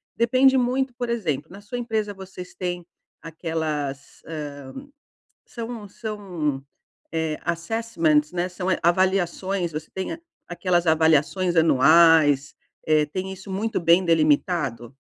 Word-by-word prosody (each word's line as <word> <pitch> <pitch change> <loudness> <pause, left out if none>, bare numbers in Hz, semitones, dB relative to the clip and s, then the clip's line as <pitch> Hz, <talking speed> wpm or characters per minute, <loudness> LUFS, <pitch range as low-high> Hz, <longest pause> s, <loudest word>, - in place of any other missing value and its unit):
depende 255 +3 +4
muito, 255 +1 0
por 245 -1 -4
exemplo, 160 - -2
na 195 - -10
sua 210 +4 -7
empresa 220 -3 -2
vocês 190 -2 -10
têm 175 -1 -4 0.4
aquelas, 155 -4 -4
hã, 155 -2 -5 1.0
são 230 -3 -7
são, 185 - -4 0.5
eh, 160 -1 -1
assessments, 170 -5 0
né, 180 0 -2
são, 185 +1 -3
eh, - - +1
avaliações. 185 0 +1
Você 155 +1 -6
tem 190 +10 -4
a 330 - -8 0.3
aquelas 175 -1 0
avaliações 160 +3 +2
anuais, 155 -1 +5 0.3
eh, 155 -1 +4
tem 185 +5 -5
isso 190 +1 -10
muito 215 +4 -1
bem 170 +2 +4
delimitado? 150 -6 +1
175 Hz, 125 wpm, -24 LUFS, 155-200 Hz, 1.0 s, anuais